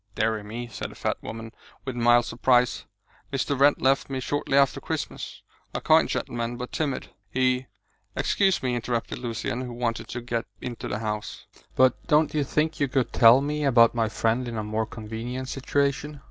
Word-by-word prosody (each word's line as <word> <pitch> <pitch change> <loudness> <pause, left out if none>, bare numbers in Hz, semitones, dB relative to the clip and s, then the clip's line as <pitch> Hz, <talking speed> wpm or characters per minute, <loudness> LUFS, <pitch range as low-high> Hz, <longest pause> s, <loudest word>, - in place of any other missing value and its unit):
"Deary 110 0 +1
me!" 115 +4 -6
said 110 - -6
the - - -13
fat - - -1
woman, 115 0 -7 0.3
with 130 -2 -4
mild 120 0 +4
surprise. 125 +1 +2 0.5
"Mr. 135 0 -1
Wrent 145 +1 +5
left 135 +1 +3
me 135 -1 -2
shortly 140 +1 0
after 140 -1 +3
Christmas. - - -5 0.3
A - - 0
kind - - +4
gentleman, 120 0 -3
but 125 0 -6
timid; 145 -5 -2 0.2
he 130 +2 +1 0.2
" - - -43
"Excuse 190 -6 +2
me," 125 -1 0
interrupted 115 -3 -2
Lucian, 120 0 -3
who 125 -2 -6
wanted 120 -1 -2
to 120 - -5
get 115 -1 -3
into 120 -2 -5
the 105 - -2
house, 105 -1 -4 0.3
"but 130 0 +3
don't 150 0 +3
you 150 -2 +1
think 155 +3 0
you 140 - +2
could 130 -1 0
tell 115 +3 +7
me 150 +1 -2
about 120 -4 +5
my 115 -2 +1
friend 115 +3 0
in 115 -1 -4
a 110 - -2
more 110 +1 -2
convenient 115 +4 -6
situation?" 140 +2 -1
125 Hz, 185 wpm, -26 LUFS, 115-135 Hz, 0.5 s, tell